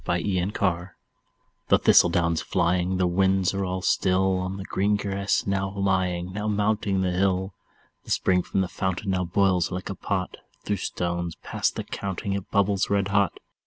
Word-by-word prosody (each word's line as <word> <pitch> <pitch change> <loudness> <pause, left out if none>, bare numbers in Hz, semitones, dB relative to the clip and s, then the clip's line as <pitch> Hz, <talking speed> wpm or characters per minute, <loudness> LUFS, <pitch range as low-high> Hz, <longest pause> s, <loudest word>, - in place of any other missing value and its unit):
Autumn 90 +1 0 1.2
The - - +5
thistle - - +5
down's 85 -1 +1
flying, 90 +1 0
though 90 - +1
the - - +2
winds 95 +1 +2
are 100 0 -1
all 95 0 -3
still, 95 +1 +2
On 95 +1 -3
the 95 - -6
green 100 +2 +1
grass 100 -1 -1
now 95 0 0
lying, 95 -2 0
now 105 +1 -3
mounting 105 -2 +1
the 90 -1 0
hill, 95 +1 0 0.5
The - - -13
spring 90 -1 +2
from 95 - -1
the 95 - 0
fountain 95 +2 -2
now 90 -1 0
boils 90 -1 +2
like 90 +1 -4
a - - -5
pot; 95 -2 -3 0.3
Through 105 - -1
stones 85 -2 -3
past - - -1
the - - -3
counting 100 0 -4
it 100 -1 -4
bubbles 100 -1 +1
red 100 -1 +1
hot. 100 -2 +1
95 Hz, 175 wpm, -25 LUFS, 90-100 Hz, 1.2 s, The